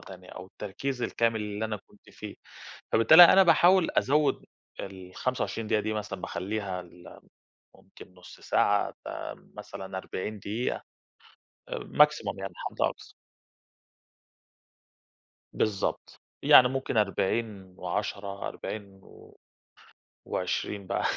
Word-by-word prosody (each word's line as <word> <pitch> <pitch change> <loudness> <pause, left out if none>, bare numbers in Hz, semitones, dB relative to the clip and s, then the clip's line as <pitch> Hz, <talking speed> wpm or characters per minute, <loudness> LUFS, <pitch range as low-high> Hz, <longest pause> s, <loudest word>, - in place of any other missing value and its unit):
تانية، 90 -1 -12
أو 90 - -9
التركيز 125 +7 -5
الكامل 115 -2 0
اللي 105 +1 -3
أنا 110 -1 -2
كنت - - -21
فيه، - - -9 0.6
فبالتالي 155 +11 +9
أنا 190 +3 +7
باحاول 180 0 +5
أزوّد 145 +1 +2 0.4
ال25 95 +5 -4
دقيقة 105 0 +2
دي، 110 +1 -2
مثلًا 105 -1 -5
باخلّيها 95 0 -4
ل 85 0 -15 0.6
ممكن 90 - -16
نص 90 -1 -14
ساعة 100 0 +2 0.2
ب - - -4 0.5
مثلًا 95 0 -7
40 105 +3 -5
دقيقة. 110 +5 -3 0.9
maximum - - +2
يعني، - - -5
حد - - -6
أقصى. - - -2 2.4
بالضبط، 105 -3 -2 0.2
يعني 125 - +8
ممكن 135 -3 -3
40 100 -1 -1
و10، 100 +2 -4
40 100 -2 -7
و - - -17 0.9
و20 95 +2 -3
بقى. - - -1
105 Hz, 110 wpm, -28 LUFS, 95-115 Hz, 2.4 s, فبالتالي